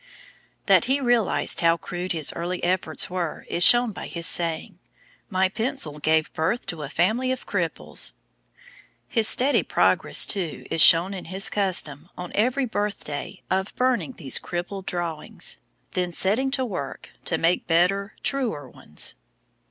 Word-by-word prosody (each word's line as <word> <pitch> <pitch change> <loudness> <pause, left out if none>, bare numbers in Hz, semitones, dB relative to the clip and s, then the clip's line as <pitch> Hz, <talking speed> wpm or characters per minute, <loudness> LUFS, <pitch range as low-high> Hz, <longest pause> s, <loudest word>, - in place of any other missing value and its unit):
That - - +4
he 265 +3 +1
realised 240 -6 +1
how 165 0 +3
crude 180 +1 -5
his 160 -4 +1
early 175 +2 -4
efforts 175 -3 +1
were 175 -3 -4
is 175 - +2
shown 240 +2 +6
by - - -8
his 170 -1 -3
saying: 170 +3 -1 0.5
"My 190 -1 +2
pencil 215 - -3
gave 155 +1 +1
birth 165 +10 -1
to 160 - -9
a 145 - -6
family 220 - 0
of 260 - -5
cripples." - - -3 0.9
His 225 -3 +1
steady 270 +5 +4
progress, - - +3
too, 180 -6 -3
is 165 - +2
shown 170 +5 +8
in 185 - -7
his 190 +3 +1
custom, 175 -6 0
on 180 -1 -7
every 255 +5 +1
birthday, 205 -10 -5
of 190 +2 -1
burning 255 0 0
these 140 - 0
'Crippled' 180 +2 -6
drawings, 170 -3 -3 0.3
then 180 -1 -2
setting 215 +10 +2
to 265 -1 -1
work 145 - -6
to 165 - +1
make 165 +2 0
better, 190 +4 +1
truer 230 - -1
ones. 75 -10 -1
185 Hz, 150 wpm, -24 LUFS, 165-225 Hz, 0.9 s, shown